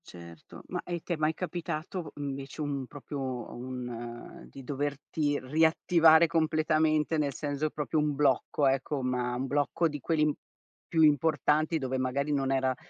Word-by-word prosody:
Certo, 85 Hz, -2 st, -12 dB
ma -, -, -3 dB
e 175 Hz, -1 st, -4 dB
ti 175 Hz, -, -3 dB
è -, -, 0 dB
mai 155 Hz, 0 st, +1 dB
capitato, 175 Hz, -1 st, -4 dB
mhmm, 145 Hz, -1 st, -4 dB
invece 135 Hz, +2 st, -6 dB
un 140 Hz, -3 st, -3 dB
proprio 135 Hz, -3 st, -5 dB
un 120 Hz, -1 st, -7 dB
di 135 Hz, -, -11 dB
doverti 145 Hz, +2 st, -2 dB
riattivare 160 Hz, +3 st, +5 dB
completamente, 155 Hz, -1 st, +2 dB
nel 145 Hz, -2 st, 0 dB
senso 145 Hz, +1 st, -2 dB
proprio 150 Hz, +1 st, -1 dB
un 150 Hz, -1 st, 0 dB
blocco 140 Hz, 0 st, +2 dB
ecco, 135 Hz, +1 st, 0 dB
ma 125 Hz, -1 st, -1 dB
un 130 Hz, +2 st, -2 dB
blocco 145 Hz, +4 st, +1 dB
di 145 Hz, -2 st, -5 dB
quelli 150 Hz, 0 st, +1 dB, 0.5 s
più 160 Hz, -1 st, +3 dB
importanti, 155 Hz, +1 st, +3 dB
dove 130 Hz, -3 st, -2 dB
magari 140 Hz, +3 st, 0 dB
non 135 Hz, -1 st, 0 dB
era 130 Hz, -1 st, +1 dB
145 Hz, 155 wpm, -29 LUFS, 130-155 Hz, 0.5 s, riattivare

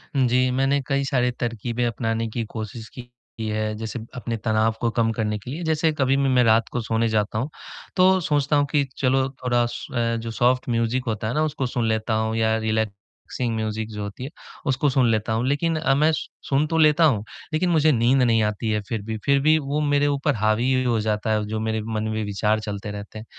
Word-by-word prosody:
हुँ, 130 Hz, -2 st, +3 dB
जी, 125 Hz, +1 st, +2 dB
मैंने 135 Hz, +2 st, +2 dB
कई 140 Hz, -1 st, +1 dB
सारे 125 Hz, -3 st, +1 dB
तरकीबें 120 Hz, 0 st, -2 dB
अपनाने 115 Hz, 0 st, -1 dB
की 115 Hz, +1 st, -3 dB
कोशिश 110 Hz, 0 st, -6 dB
की -, -, -4 dB, 0.5 s
है। 110 Hz, 0 st, -2 dB
जैसे 110 Hz, +2 st, -5 dB, 0.2 s
अपने 120 Hz, -2 st, -3 dB
तनाव 110 Hz, +1 st, +1 dB
को 120 Hz, -, +2 dB
कम 115 Hz, -1 st, +1 dB
करने 105 Hz, -1 st, -1 dB
के 120 Hz, -, -8 dB
लिए, 165 Hz, +5 st, -5 dB
जैसे 160 Hz, 0 st, +1 dB
कभी-भी 135 Hz, +1 st, +2 dB
मैं 125 Hz, -1 st, +4 dB
रात 115 Hz, 0 st, +4 dB
को 120 Hz, -, -2 dB
सोने 115 Hz, +1 st, 0 dB
जाता 110 Hz, -1 st, 0 dB
हूँ, 130 Hz, +6 st, -2 dB, 0.5 s
तो 185 Hz, 0 st, +5 dB
सोचता 145 Hz, -2 st, +1 dB
हूँ 145 Hz, 0 st, +3 dB
कि 145 Hz, -2 st, +3 dB
चलो 130 Hz, 0 st, +2 dB, 0.2 s
थोड़ा 120 Hz, -1 st, +2 dB
सो 140 Hz, +7 st, -7 dB
अ, 115 Hz, -1 st, +1 dB
जो 115 Hz, 0 st, -5 dB
सॉफ्ट 125 Hz, +2 st, +1 dB
म्यूज़िक 115 Hz, +2 st, 0 dB
होता 110 Hz, -1 st, -2 dB
है 115 Hz, -, -2 dB
ना 155 Hz, -, +1 dB
उसको 150 Hz, -3 st, -2 dB
सुन 120 Hz, -2 st, -1 dB
लेता 110 Hz, 0 st, 0 dB
हूँ 110 Hz, 0 st, -1 dB
या 110 Hz, 0 st, +2 dB
रिलैक्सिंग 110 Hz, +2 st, -3 dB
म्यूज़िक 110 Hz, 0 st, -3 dB
जो 105 Hz, -1 st, -5 dB
होती 100 Hz, +4 st, -7 dB
है 135 Hz, -, -5 dB, 0.4 s
उसको 135 Hz, +2 st, +2 dB
सुन 130 Hz, -2 st, +3 dB
लेता 110 Hz, 0 st, 0 dB
हूँ। 115 Hz, +3 st, 0 dB
लेक़िन 155 Hz, +4 st, +1 dB
अ, 155 Hz, -4 st, +2 dB
मैं 155 Hz, +3 st, +4 dB
स 155 Hz, -, -3 dB, 0.2 s
सुन 140 Hz, +2 st, +3 dB
तो 165 Hz, +1 st, -1 dB
लेता 155 Hz, +1 st, +5 dB
हूँ 115 Hz, -10 st, +2 dB, 0.3 s
लेक़िन 175 Hz, +3 st, +1 dB
मुझे 155 Hz, -2 st, +4 dB
नींद 125 Hz, +1 st, +3 dB
नहीं 115 Hz, -2 st, +3 dB
आती 105 Hz, +1 st, -1 dB
है 105 Hz, -1 st, 0 dB
फ़िर 115 Hz, -3 st, -2 dB
भी 110 Hz, 0 st, -3 dB
फ़िर 140 Hz, 0 st, +4 dB
भी 155 Hz, +2 st, +4 dB
वो 145 Hz, +1 st, -2 dB
मेरे 145 Hz, 0 st, +2 dB
ऊपर 140 Hz, -3 st, 0 dB
हावी 110 Hz, +4 st, +1 dB
हो 120 Hz, -3 st, +1 dB
जाता 110 Hz, 0 st, -1 dB
है 105 Hz, -1 st, +1 dB
जो 110 Hz, +1 st, -3 dB
मेरे 110 Hz, 0 st, -1 dB
मन 110 Hz, -1 st, -3 dB
में 110 Hz, -, -2 dB
विचार 105 Hz, +2 st, 0 dB
चलते 105 Hz, -1 st, -5 dB
रहते 105 Hz, +1 st, -8 dB
हैं। 110 Hz, -, -10 dB
120 Hz, 225 wpm, -23 LUFS, 110-135 Hz, 0.5 s, तो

